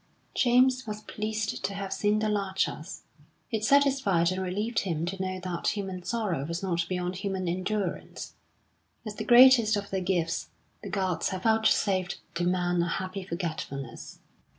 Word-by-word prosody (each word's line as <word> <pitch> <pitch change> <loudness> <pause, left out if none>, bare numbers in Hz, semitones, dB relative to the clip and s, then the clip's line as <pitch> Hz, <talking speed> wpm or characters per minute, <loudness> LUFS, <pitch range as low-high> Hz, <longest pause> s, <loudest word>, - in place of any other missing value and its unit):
James 255 +1 +3
was 210 0 -5
pleased 215 0 -3
to 200 - -2
have 195 -1 -3
seen 210 0 +1
the 215 0 0
Larchers. 195 -2 -2 0.5
It 220 -2 -1
satisfied 265 -10 +3
and 185 +1 -2
relieved 205 +6 -1
him 165 -4 -2
to 190 +2 -4
know 185 0 -2
that 180 +3 -2
human 190 -2 -4
sorrow 195 -8 -2
was 170 +5 -4
not 170 -3 -1
beyond 180 0 -2
human 190 -2 -3
endurance: 185 +1 -3 0.7
as 215 - -4
the 215 - -3
greatest 240 -1 +7
of 200 0 -5
their 190 -1 -1
gifts, 175 -3 -1 0.3
the 205 - -7
gods 190 -2 0
have 185 -1 -5
vouchsafed 205 -4 +2
to 170 - -2
man 175 -1 +1
a 170 - 0
happy 185 +3 -3
forgetfulness. 165 -7 -5
190 Hz, 155 wpm, -28 LUFS, 180-215 Hz, 0.7 s, greatest